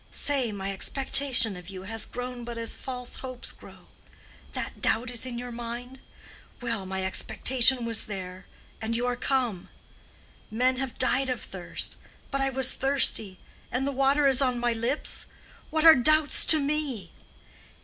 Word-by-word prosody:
Say, 270 -5 +1
my 195 -1 -4
expectation 255 +1 +2
of 180 0 -10
you 190 -1 -8
has 225 +2 -2
grown 245 0 -6
but 235 0 -6
as 230 0 -2
false 250 -2 -6
hopes 255 -1 -6
grow. - - -15 0.7
That - - -5
doubt 245 +2 +1
is 245 +1 +1
in 240 -2 -5
your 245 0 -6
mind? 240 +2 -7 0.6
Well, 230 -6 -3
my 190 0 -3
expectation 245 +6 +3
was 230 -1 0
there, 185 -2 -7 0.3
and 225 +1 0
you 245 - -1
are 245 0 0
come. 245 -7 -1 0.8
Men 255 +3 +1
have 265 -2 -4
died 260 +1 +2
of 255 - -1
thirst. - - -4 0.3
But 275 -1 -1
I 270 - +2
was 265 -1 +3
thirsty, 260 -8 +2 0.3
and 250 +3 -1
the 280 - -1
water 275 +2 +2
is 270 -1 +6
on 255 -2 +1
my 240 0 +1
lips! 235 +6 -1 0.4
What 315 0 0
are 325 - +11
doubts 310 +3 +3
to 315 - +7
me? 280 - -2
245 Hz, 160 wpm, -27 LUFS, 225-270 Hz, 0.8 s, are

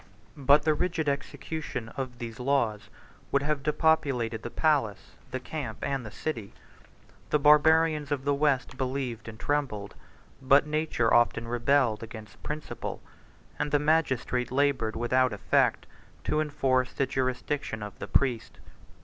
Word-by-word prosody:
But 140 +2 +4
the 155 - +3
rigid 170 -1 -1
execution 140 -3 -4
of 130 -1 -5
these 115 -2 -7
laws 125 -5 0 0.4
would 140 0 +2
have 150 -1 0
depopulated 140 -7 +1
the 120 - -5
palace, 120 - 0 0.2
the 130 - -3
camp, 145 +4 -5
and 135 -2 -1
the 110 - -7
city; 115 -3 -5 0.8
the - - +3
Barbarians 150 0 +4
of 140 -2 -1
the 145 - +3
West 140 -2 +1
believed 130 -4 -3
and 110 -1 -9
trembled; 135 -9 -2 0.5
but 140 +2 +5
nature 150 -6 0
often 120 -1 +3
rebelled 120 -1 +2
against 110 -2 -10
principle; 150 0 -5 0.6
and 150 - 0
the 145 - +3
magistrate 145 -5 +1
labored 135 -5 +1
without 125 +1 +2
effect 100 - +1 0.4
to 155 - +1
enforce 135 -4 0
the 135 - +1
jurisdiction 130 -2 -2
of 105 -2 -8
the - - -5
priest. 120 -5 0
135 Hz, 140 wpm, -28 LUFS, 120-150 Hz, 0.8 s, but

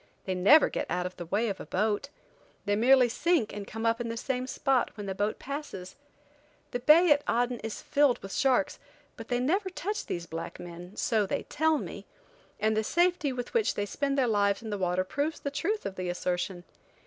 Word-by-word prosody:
They 190 - -1
never 205 +13 +6
get - - -3
out 180 +1 -1
of 180 - -5
the 175 -2 -7
way 210 +6 +1
of 200 -3 -3
a - - -7
boat. 215 +7 0 0.6
They 205 - +2
merely 250 +3 +5
sink 295 0 +1
and 205 -1 -6
come 225 +1 -5
up 230 +1 +2
in 230 - -3
the 230 - -4
same 255 +1 -2
spot 265 -1 +1
when 205 - -5
the 195 - -3
boat 205 +2 -1
passes. 275 -10 -6 0.8
The 245 - -2
bay 310 +6 +6
at 290 0 +5
Aden 245 0 +1
is 225 -1 -6
filled 285 -3 +3
with 195 - -7
sharks, 275 +2 +2 0.4
but - - -9
they 245 -2 0
never 375 +10 +1
touch 395 +3 -4
these 170 -1 -3
black 165 0 -6
men, 175 +2 -9
so 215 -3 +1
they - - -2
tell 315 +1 +1
me, - - -7 0.5
and 215 +1 +2
the 220 - +1
safety 345 +1 +2
with 245 -1 -5
which 460 -3 +2
they 205 - -1
spend 275 +6 -2
their 265 - +3
lives 205 -1 +1
in 220 - -5
the 205 - -2
water 180 0 +1
proves 290 +11 -2
the 280 - -4
truth 400 +9 -2
of 190 - -5
the 185 -1 -3
assertion. 180 +1 -2
230 Hz, 215 wpm, -29 LUFS, 195-285 Hz, 0.8 s, never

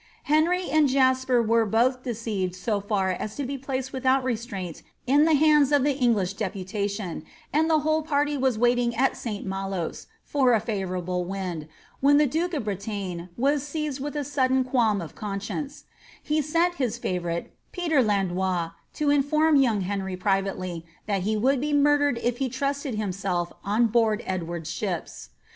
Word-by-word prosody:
Henry 335 +5 +2
and 300 0 +3
Jasper 260 -2 +3
were 230 +1 +3
both 240 +4 +2
deceived 215 -7 -3
so 205 +3 -1
far 195 -2 0
as 210 +4 -4
to 285 - -3
be 275 +2 -3
placed 265 -1 -4
without 260 0 +2
resistance 215 -8 -4 0.2
in 285 +4 +4
the 320 -1 +4
hands 300 -1 +5
of 290 -2 +4
the 285 -1 +2
English 225 -8 +1
deputation, 200 -2 -3 0.3
and 315 +2 +3
the 310 -2 +3
whole 310 +1 +1
party 295 -1 0
were 265 -1 +1
only 235 -4 0
waiting 240 0 +2
at 265 +4 +2
St. 210 -4 -5
Malos, 195 -3 -4 0.2
for 265 -4 +2
a 225 - +4
favourable 185 -4 -2
wind, 180 -4 -4 0.3
when 285 +1 +5
the 300 - +5
duke 330 +6 -1
of 285 - -2
Bretagne 200 -4 -4
was 280 +3 +2
seized 295 -1 -3
with 290 +2 -4
a 295 - -1
sudden 260 -2 +1
qualm 235 -6 +1
of 165 - -8
conscience; 210 +8 -5 0.4
he 305 +1 +1
sent 335 +4 +1
his 235 -3 0
favourite, 175 -6 -3 0.2
Peter 330 -6 +2
Landois, 190 -5 0 0.2
to 295 -2 +1
inform 305 +2 +3
young 240 -7 +3
Henry 190 0 -3
pri\'ately 185 -2 -1 0.2
that 200 -3 0
he 215 +3 0
would 260 +4 +2
be 295 +1 -1
murdered 290 -2 +3
if 240 0 0
he 265 -2 0
trusted 275 0 -2
himself 190 -4 -2
on 215 +4 +2
board 225 -1 +2
Edward's 170 -3 -4
ships. 185 -6 -4
235 Hz, 170 wpm, -26 LUFS, 195-280 Hz, 0.4 s, hands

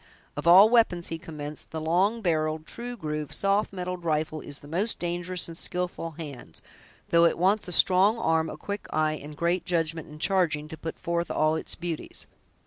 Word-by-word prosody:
"Of 145 +3 -4
all 190 +5 +9
we'pons," 220 -7 +3
he 165 - -4
commenced, 150 -2 -6
"the 160 - -4
long 190 +8 +1
barreled, 155 -2 0
true 240 +6 -6
grooved, 150 -4 -4
soft 200 +2 +1
metaled 180 -2 -5
rifle 155 -1 -1
is 145 - -4
the 145 - -12
most 190 +9 0
dangerous 175 +1 -2
in 165 - -7
skillful 175 -1 -4
hands, 140 - -8 0.5
though 170 0 +5
it 170 - +2
wants 195 +5 +2
a - - -5
strong 190 +5 +5
arm, 160 -5 +1
a - - -7
quick 205 0 -5
eye, 155 0 0
and 150 0 -9
great 170 +3 +1
judgment 165 -2 -1
in 150 - -10
charging, 155 -4 +1
to 160 - -6
put 160 +1 -6
forth 170 0 -2
all 155 +1 +2
its 160 - -3
beauties. 170 -2 -5
170 Hz, 190 wpm, -27 LUFS, 155-180 Hz, 0.5 s, all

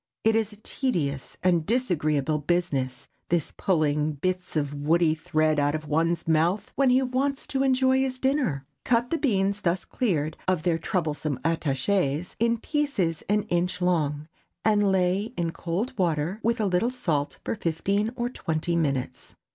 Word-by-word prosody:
It 225 0 +4
is 220 -1 +1
a - - -12
tedious 165 - -2
and 175 -3 +3
disagreeable 155 - +1
business, 145 -6 -1 0.2
this 170 -3 0
pulling 155 -4 +1
bits 180 +5 -3
of 145 -2 0
woody 155 +3 +2
thread 155 -1 +1
out 145 +1 +2
of 155 0 -4
one's 165 +3 0
mouth 170 +6 +1
when 275 -1 +3
he 255 +1 +4
wants 265 +2 -1
to 270 - -1
enjoy 260 0 +3
his 265 -1 0
dinner. 255 - 0 0.2
Cut 240 0 +1
the 330 - +1
beans 200 -6 +1
thus 175 +1 0
cleared 160 - -1
of 185 -4 +1
their 170 -2 +1
troublesome 155 -5 -2
attachés, 160 +1 0
in 235 +1 +2
pieces 230 - -1
an 210 0 +2
inch 180 -2 -1
long, 155 -5 0 0.4
and 205 -2 +4
lay 190 +4 +1
in 170 -1 0
cold 185 +11 -3
water 170 +2 0
with 230 +2 +1
a 215 - +1
little 190 +5 +2
salt 165 - -1
for - - -1
fifteen 200 +5 0
or 240 -1 -1
twenty 165 -7 -2
minutes. 140 -6 -2
180 Hz, 160 wpm, -26 LUFS, 155-220 Hz, 0.4 s, It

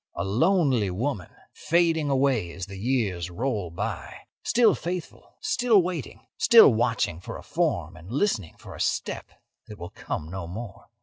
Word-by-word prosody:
A - - -2
lonely 130 - +2
woman 105 - -3 0.2
fading 165 -3 +1
away 130 -9 +1
as 95 +1 -5
the 100 0 -9
years 100 -7 -1
roll 105 -1 -2
by; 85 - -5 0.3
still 235 -2 +4
faithful, 175 0 -6
still 245 -4 +3
waiting, 175 -6 -5
still 225 - +8
watching 110 -6 0
for - - -7
a - - -11
form - - -1
and 85 +6 -12
listening 125 - 0
for - - -11
a - - -7
step - - -2 0.4
that 105 - -10
will 85 -2 -8
come 80 +2 -5
no 95 -3 -5
more. 100 +3 -8
115 Hz, 160 wpm, -26 LUFS, -, 0.4 s, still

